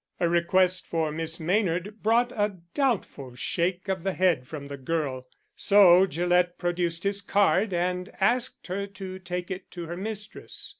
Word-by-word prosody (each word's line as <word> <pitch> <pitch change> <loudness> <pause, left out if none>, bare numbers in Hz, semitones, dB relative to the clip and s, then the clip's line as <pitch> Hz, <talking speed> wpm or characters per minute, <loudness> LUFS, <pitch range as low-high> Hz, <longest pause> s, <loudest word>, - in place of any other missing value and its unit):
A 175 - +2
request 180 +2 +2
for 160 -2 -1
Miss 160 +1 -2
Maynard 185 +3 -1
brought 235 +3 +3
a 205 -3 -1 0.2
doubtful 205 - -1
shake 175 +7 -1
of 190 -2 -1
the 190 +2 -1
head 175 -9 +2
from 145 -2 -7
the 140 - -6
girl, 135 -2 -3 0.3
so 190 -2 +6
Gillett 175 +2 +1
produced 175 -1 -1
his 200 0 0
card 200 +1 +2
and 180 +2 -1
asked 240 +6 +1
her 200 +2 -3
to 190 -1 -8
take 180 0 -5
it 185 0 -6
to 175 -2 -7
her 170 +1 -5
mistress. 210 +1 -6
180 Hz, 160 wpm, -27 LUFS, 170-200 Hz, 0.3 s, so